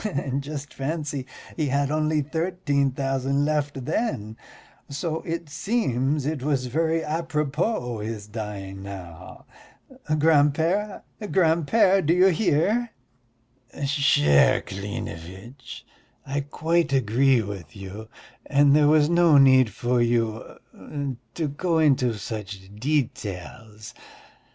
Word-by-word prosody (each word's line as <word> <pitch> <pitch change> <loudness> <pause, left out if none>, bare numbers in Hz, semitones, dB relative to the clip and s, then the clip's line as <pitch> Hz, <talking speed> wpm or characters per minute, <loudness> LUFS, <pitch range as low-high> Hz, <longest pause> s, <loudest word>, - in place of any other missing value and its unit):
And 140 -9 -2
just 145 0 -7
fancy, 145 -2 -4 0.3
he 155 -3 -1
had 140 +1 0
only 155 0 +1
thirteen 160 -3 0
thousand 135 +1 -1
left 145 -3 -2
then, 130 - -2 0.5
so 160 +3 -3
it 165 0 -3
seems 145 - -1
it 150 -2 -2
was 135 -2 0
very 160 +5 0
apropos 150 - -2
his 105 -1 -5
dying 105 -3 -7
now. 95 -4 -10 0.7
Grand 150 -2 +4
père, 195 +6 -1 0.3
grand 165 -4 +2
père, 195 -2 +4
do 160 +3 +2
you 185 +2 +6
hear?" 205 +6 +1 1.0
"Cher 135 - +4
Klinevitch, 100 +4 -8 0.4
I 140 +2 -2
quite 165 +2 0
agree 130 0 +3
with 95 -7 -8
you, 100 +3 -9 0.4
and 145 0 +4
there 150 -1 +5
was 150 -1 +5
no 170 -2 +5
need 130 -3 +6
for 120 +4 0
you... 115 -2 -1 0.8
to 160 -3 -1
go 165 +4 -1
into 135 -6 +3
such 100 -2 -7
details. 110 -4 -4
140 Hz, 110 wpm, -24 LUFS, 115-155 Hz, 1.0 s, you